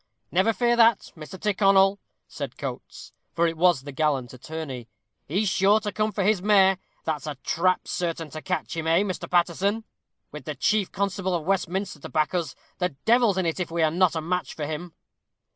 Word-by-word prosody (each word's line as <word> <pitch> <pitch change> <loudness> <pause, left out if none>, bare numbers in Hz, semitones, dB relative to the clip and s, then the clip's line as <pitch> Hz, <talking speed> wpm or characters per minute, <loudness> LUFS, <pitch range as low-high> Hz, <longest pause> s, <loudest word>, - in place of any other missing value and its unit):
"Never 190 +6 +3
fear 240 +1 +2
that, 230 -2 +4
Mr. 160 +3 -10
Tyrconnel," 195 -1 +3 0.3
said - - -7
Coates; - - -7 0.2
for 170 - +2
it 165 0 0
was 170 -4 +3
the 145 - -7
gallant 135 -4 0
attorney: 130 -3 -7 0.4
"he's 195 +8 0
sure 195 +3 +4
to 210 -1 -4
come 215 +2 0
for 205 - -1
his 205 -1 +2
mare. 195 -2 +4 0.2
That's 155 -1 -3
a 150 - -4
trap 185 +2 +1
certain 165 -3 -3
to 155 - -7
catch 180 -1 -3
him, 165 -1 -3
eh, 165 +3 +4
Mr. 190 -3 -4
Paterson? 185 +5 +1 0.5
With - - -9
the - - -4
chief 210 -3 +1
constable 195 -2 -1
of 165 -3 -3
Westminster 190 -2 -1
to - - -9
back 155 +2 0
us, 170 -6 -2 0.2
the 180 -1 +1 0.2
devil's 230 -4 +4
in 190 - +1
it 165 +2 -1
if 180 - -2
we 165 0 0
are 155 - +3
not 180 0 +2
a 160 - -1
match 180 +2 -2
for 150 - -3
him." 160 +3 -6
180 Hz, 195 wpm, -25 LUFS, 160-200 Hz, 0.5 s, that